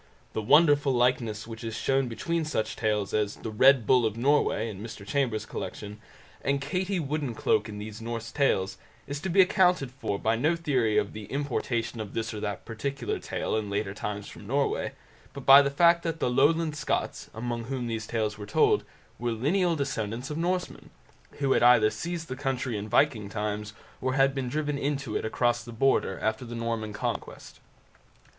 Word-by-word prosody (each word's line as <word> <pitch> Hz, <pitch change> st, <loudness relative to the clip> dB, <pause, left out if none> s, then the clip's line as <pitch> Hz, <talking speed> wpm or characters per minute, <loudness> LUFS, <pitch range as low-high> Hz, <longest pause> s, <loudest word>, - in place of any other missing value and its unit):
The 110 Hz, -, -1 dB
wonderful 145 Hz, +3 st, +5 dB
likeness 120 Hz, -3 st, +1 dB
which 115 Hz, 0 st, -9 dB
is 115 Hz, -1 st, -4 dB
shown 135 Hz, -1 st, +1 dB
between 165 Hz, +9 st, -2 dB
such 150 Hz, -8 st, -2 dB
tales 105 Hz, -2 st, -1 dB
as 105 Hz, -1 st, 0 dB
the 110 Hz, -, -6 dB
"Red 130 Hz, +2 st, +5 dB
Bull 125 Hz, +1 st, +4 dB
of 110 Hz, -1 st, -1 dB
Norway" 130 Hz, -3 st, +2 dB
in 100 Hz, -3 st, -7 dB
Mr 110 Hz, -2 st, -8 dB
Chambers' 110 Hz, -3 st, 0 dB
collection, 105 Hz, -1 st, -6 dB, 0.4 s
and 140 Hz, 0 st, 0 dB
Katie 180 Hz, +7 st, -1 dB
Woodencloak 140 Hz, -7 st, 0 dB
in 105 Hz, -, -7 dB
these 105 Hz, +1 st, -7 dB
Norse 115 Hz, 0 st, -5 dB
Tales, 95 Hz, -10 st, +1 dB, 0.3 s
is 140 Hz, 0 st, -4 dB
to 190 Hz, -, -3 dB
be 190 Hz, +2 st, +6 dB
accounted 180 Hz, -7 st, +3 dB
for 130 Hz, -6 st, -3 dB
by 110 Hz, +3 st, +1 dB
no 150 Hz, +9 st, +2 dB
theory 130 Hz, -10 st, +1 dB
of 100 Hz, -, 0 dB
the 110 Hz, -1 st, -7 dB
importation 120 Hz, -3 st, -2 dB
of 105 Hz, -2 st, -6 dB
this 115 Hz, -1 st, -2 dB
or 105 Hz, -, -5 dB
that 105 Hz, -2 st, -4 dB
particular 135 Hz, +5 st, -3 dB
tale -, -, -3 dB
in 110 Hz, -2 st, -2 dB
later 100 Hz, -1 st, -2 dB
times 105 Hz, 0 st, -5 dB
from -, -, -11 dB
Norway, -, -, 0 dB, 0.4 s
but 140 Hz, -2 st, -8 dB
by 135 Hz, +1 st, +10 dB
the 140 Hz, -, +1 dB
fact 170 Hz, +4 st, +4 dB
that 165 Hz, -1 st, -3 dB
the 125 Hz, -, 0 dB
Lowland 155 Hz, +4 st, +3 dB
Scots, 150 Hz, -, -2 dB
among 115 Hz, 0 st, -3 dB
whom 130 Hz, 0 st, -3 dB
these 110 Hz, -2 st, -3 dB
tales 110 Hz, -2 st, -2 dB
were 105 Hz, -, -7 dB
told, -, -, +3 dB, 0.4 s
were 120 Hz, 0 st, -1 dB
lineal 170 Hz, -, +1 dB
descendants 125 Hz, -2 st, -3 dB
of 150 Hz, -, -3 dB
Norsemen, 180 Hz, +1 st, -2 dB, 0.4 s
who 140 Hz, -2 st, -1 dB
had -, -, +4 dB
either 120 Hz, -3 st, +6 dB
seized 165 Hz, +9 st, -4 dB
the 130 Hz, -, -4 dB
country 130 Hz, -3 st, -2 dB
in 105 Hz, 0 st, -3 dB
the -, -, -10 dB
Viking 110 Hz, -6 st, +2 dB
times, 105 Hz, 0 st, -3 dB, 0.3 s
or 130 Hz, 0 st, 0 dB
had 135 Hz, 0 st, +4 dB
been 135 Hz, -3 st, -3 dB
driven 145 Hz, +1 st, -2 dB
into 140 Hz, -5 st, -2 dB
it -, -, -1 dB
across 120 Hz, +2 st, +1 dB
the 120 Hz, -, -9 dB
Border 135 Hz, +4 st, +1 dB
after 110 Hz, +2 st, -1 dB
the 120 Hz, -1 st, -7 dB
Norman 115 Hz, -2 st, -2 dB
Conquest. 105 Hz, -, -5 dB
120 Hz, 190 wpm, -28 LUFS, 110-140 Hz, 0.4 s, by